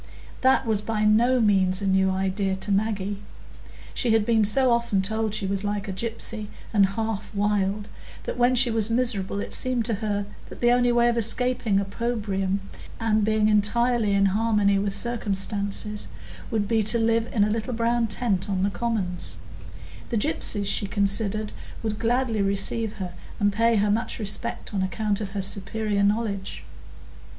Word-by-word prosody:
That 260 0 +3
was 220 -3 +1
by 215 0 -2
no 235 +4 +4
means 190 -4 +3
a 200 - -3
new 190 0 +3
idea 190 +1 -1
to 190 +2 -4
Maggie; 200 -1 -1 0.7
she 235 -3 +2
had 220 -2 +3
been 225 -1 +3
so 250 +5 +4
often 235 -4 +1
told 220 +2 -1
she 215 -2 -2
was 195 +1 -2
like 205 0 -2
a 195 - -3
gypsy, 225 +1 -3 0.3
and 200 -2 +5
"half 220 -2 -3
wild," 205 0 0 0.4
that - - -4
when 245 +1 +3
she 245 -1 +4
was 220 -1 +1
miserable 230 -5 0
it - - -3
seemed 255 -3 +1
to 230 - -1
her 205 -2 -1 0.2
the 240 0 +1
only 245 0 +3
way 240 0 +3
of 235 0 +1
escaping 230 -2 +1
opprobrium, 200 -2 -2 0.4
and 220 -2 +1
being 215 0 +2
entirely 215 +1 +2
in 200 0 +3
harmony 210 -2 +2
with 200 0 -1
circumstances, 205 -1 -1 0.4
would 210 -2 -1
be 225 0 +2
to 215 +2 +2
live 230 0 +1
in 210 - +2
a 210 - +1
little 225 +3 -2
brown 235 0 +1
tent 205 -4 0
on 190 -1 0
the 200 - +1
commons; 200 -6 -2 0.7
the 235 - -1
gypsies, 210 -5 0
she 200 +1 0
considered, 205 +1 0 0.3
would 215 -1 -3
gladly 235 -2 0
receive 200 +3 0
her 185 -3 -6 0.3
and 205 -1 +2
pay 230 +2 +3
her 205 0 +2
much 225 +3 -1
respect 210 0 -4
on 195 - 0
account 205 +2 -1
of 195 -2 -5
her 200 -2 -2
superior 200 +1 -1
knowledge. 200 -1 -1
210 Hz, 170 wpm, -25 LUFS, 200-230 Hz, 0.7 s, and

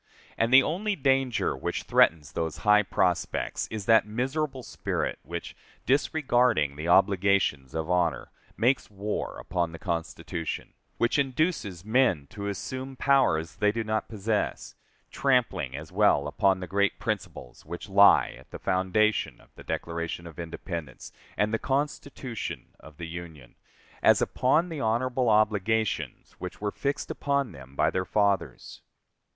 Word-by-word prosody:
And 115 +1 +1
the 130 +1 +8
only 200 +8 -1
danger 135 -5 +1
which - - -3
threatens 80 -4 +3
those 80 -2 -3
high 105 0 +6
prospects 95 -3 -1
is 110 -3 -6
that 110 -1 +5
miserable 130 +4 -2
spirit - - -3
which, 85 +4 -7 0.3
disregarding 125 - +2
the 75 +3 -5
obligations 95 -7 +3
of 80 -1 -2
honor, 90 -2 0 0.3
makes 125 +4 +2
war 105 +1 -4
upon 85 -2 -2
the - - -7
Constitution; 85 -3 -4 0.2
which 120 +4 +2
induces 130 - -1
men 110 - +2
to 100 -1 -5
assume 130 +6 -5
powers 125 -14 +2
they 105 0 +3
do 115 +1 -2
not 110 0 -2
possess, 105 0 -2 0.4
trampling 115 - +1
as 75 +1 -9
well 70 0 +3
upon 95 +4 +1
the - - -3
great 100 +2 +1
principles - - -5
which 85 +2 -7
lie 100 +1 +6
at - - -18
the - - -7
foundation 95 +4 +1
of - - -23
the - - -13
Declaration 85 +1 -4
of 85 0 -11
Independence, 85 -4 -6 0.3
and 105 +1 +1
the 115 - +1
Constitution 135 -3 -3
of 75 -1 -15
the 85 0 -6
Union, 80 -7 -9 0.5
as - - +5
upon 155 +8 +2
the 160 -3 -5
honorable 120 +2 +1
obligations 110 0 +1
which 90 -1 -7
were 105 0 -2
fixed 140 +5 -3
upon 140 -4 -1
them 65 -3 -13
by 75 +2 +2
their 95 - -1
fathers. 100 0 -1
105 Hz, 145 wpm, -27 LUFS, 85-125 Hz, 0.5 s, the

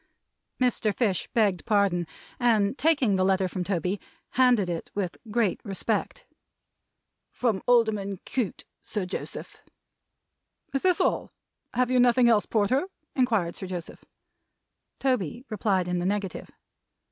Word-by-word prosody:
Mr. 245 -4 +2
Fish 200 - 0
begged 205 -6 +2
pardon, 200 -6 +2 0.3
and 225 -3 +3
taking 275 -10 +2
the 185 - +2
letter 190 0 +2
from 180 0 -3
Toby, 185 +1 -1 0.3
handed 245 -6 +4
it, 170 -2 -4
with 190 -4 -2
great 215 -3 +1
respect. 195 -4 -2 1.1
"From 225 -6 0
Alderman 215 -5 +2
Cute, 245 -7 -3 0.2
Sir 205 -4 -3
Joseph." 180 - -6 1.1
"Is 275 - 0
this 365 -2 +3
all? - - +1 0.5
Have 250 +1 +2
you 255 - +4
nothing 245 0 +5
else, 220 -3 +4
Porter?" 240 - +1 0.3
inquired 225 -10 +1
Sir 190 - -6
Joseph. 175 -2 -6 1.0
Toby 250 - -1
replied 195 -4 +1
in 180 0 0
the 175 - -2
negative. 200 -2 -3
205 Hz, 125 wpm, -27 LUFS, 185-245 Hz, 1.1 s, nothing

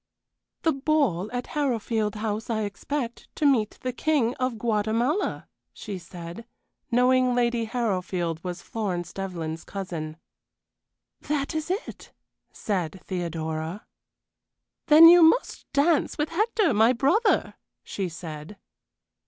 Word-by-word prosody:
"The 325 - +4
ball 270 - 0
at 245 0 -3
Harrowfield 230 -7 0
House, 215 +1 -3
I 220 -2 0
expect, 235 +4 -4
to 305 - -1
meet 235 -7 +2
the 255 -1 -2
King 260 -4 +1
of 255 -2 -1
Guatemala," 230 - 0 0.3
she 200 -3 -6
said, 175 +4 -9 0.4
knowing 250 0 +3
Lady 240 -1 +1
Harrowfield 185 -8 -2
was 180 -1 -5
Florence 180 -6 -3
Devlyn's 165 -4 -5
cousin. 165 -5 -6 1.0
"That 290 +1 -2
is 315 +1 -3
it," 385 +5 -5 0.4
said 185 -4 -3
Theodora. 165 0 -4 1.0
"Then 315 +1 +10
you 350 +1 +9
must 325 +10 +3
dance 290 +2 +2
with 300 +1 -1
Hector 425 - +1
my 220 +4 +5
brother," 350 - +2 0.3
she 190 -3 -4
said. 160 +2 -8
225 Hz, 115 wpm, -26 LUFS, 185-280 Hz, 1.0 s, Then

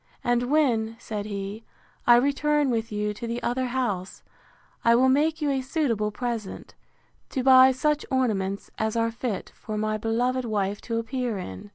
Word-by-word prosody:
And 245 0 +1
when, 235 -7 +2
said 210 -3 -5
he, 200 +1 -5 0.4
I 240 - +9
return 285 +2 +2
with 225 -1 -2
you 210 0 -1
to 235 +3 -6
the 235 +1 -2
other 255 +1 0
house, 225 -8 -3 0.6
I 230 0 +5
will 260 +2 +4
make 305 +4 +2
you 290 - +2
a 270 -1 0
suitable 255 -7 0
present, 225 -2 -5 0.6
to 260 - -2
buy 260 0 +8
you 265 - +3
such 300 +2 +1
ornaments 205 -7 -1
as 220 0 -1
are 230 0 +1
fit 230 -3 -4
for 215 -1 -6
my 215 0 0
beloved 245 +4 0
wife 205 -3 -1
to 230 - 0
appear 235 -1 -2
in. 95 - -8
235 Hz, 175 wpm, -26 LUFS, 215-260 Hz, 0.6 s, I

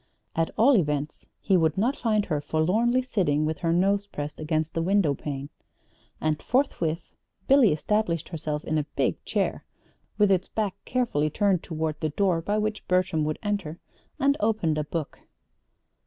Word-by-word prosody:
At 165 0 +1
all 255 +5 +6
events 150 -5 -1
he 195 - +2
would 160 -2 +2
not 240 +8 +2
find 215 -5 +1
her 150 -4 -1
forlornly 205 - +1
sitting 170 - +1
with 155 -1 -2
her 165 - 0
nose 200 +4 +2
pressed 150 -5 -6
against 155 0 -1
the 165 - -1
window 185 -4 +2
pane! 140 0 -5 0.7
And 155 -1 -1
forthwith 175 - -1 0.3
Billy 265 -6 +6
established 170 0 0
herself 155 -3 -3
in 155 0 0
a 150 - -3
big - - 0
chair - - -1 0.5
(with 205 -2 +4
its 185 -1 +2
back 210 -4 -2
carefully 230 - 0
turned 195 +1 +1
toward 160 -1 -3
the 155 - -1
door 175 +1 +1
by 205 +5 -1
which 215 0 -2
Bertram 180 -4 +1
would 155 0 -2
enter), 200 -6 -2 0.4
and 280 +1 +3
opened 205 -8 +1
a - - 0
book. 155 0 -5
170 Hz, 165 wpm, -26 LUFS, 155-210 Hz, 0.7 s, all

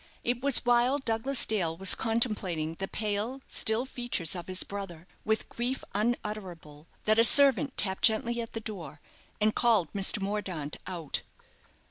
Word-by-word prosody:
It 245 0 -2
was 275 -3 +1
while 245 +3 +3
Douglas 260 +1 +1
Dale 170 -7 -2
was 195 +1 +4
contemplating 205 -9 -2
the 195 - -3
pale, 215 +6 -3
still 220 +3 +1
features 240 - -2
of 175 -2 -7
his 185 0 0
brother, 195 -5 -8 0.2
with 220 0 -1
grief 245 +3 -4
unutterable, 190 -8 -5 0.2
that 215 +1 +2
a - - +6
servant 275 +1 +7
tapped 190 -2 -1
gently 235 +1 +1
at 230 - -9
the 225 - -4
door, 190 -8 -8 0.4
and 215 0 +1
called 220 -9 +1
Mr. 200 +2 +1
Mordaunt 195 -7 -4
out. 170 -6 -3
215 Hz, 150 wpm, -28 LUFS, 185-240 Hz, 0.4 s, servant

